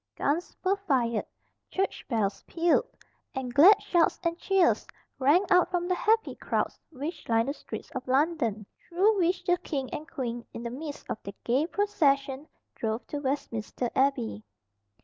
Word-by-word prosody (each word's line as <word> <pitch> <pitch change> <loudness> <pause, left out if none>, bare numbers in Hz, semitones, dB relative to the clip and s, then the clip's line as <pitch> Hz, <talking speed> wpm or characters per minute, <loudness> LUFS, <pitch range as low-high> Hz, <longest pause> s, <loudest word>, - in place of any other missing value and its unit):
Guns 315 +5 -1
were 385 +1 +2
fired, 250 - 0 0.4
church 385 +1 -2
bells 215 -5 0
pealed, 345 +8 +2 0.5
and 255 -2 -3
glad 375 - +8
shouts 350 -5 +2
and 335 -1 0
cheers 385 -3 +2 0.3
rang 295 +9 +4
out 360 -1 +5
from 350 -1 -1
the 365 - +2
happy 445 +4 +2
crowds - - -2
which 300 +1 -6
lined 230 +2 +3
the - - -1
streets - - -8
of 260 0 -6
London, 260 -6 +1 0.2
through 390 +4 +3
which 355 +1 +1
the 355 0 +2
king 270 -4 -4
and 310 +2 -6
queen, 240 -3 -4
in 230 - -5
the 235 - -4
midst 290 +3 -7
of 215 - -4
their 200 0 -8
gay 265 +7 +2
procession, 285 -8 +1 0.3
drove 220 +1 -3
to 290 - -4
Westminster 255 -4 -3
Abbey. 115 - +1
285 Hz, 160 wpm, -28 LUFS, 245-355 Hz, 0.5 s, glad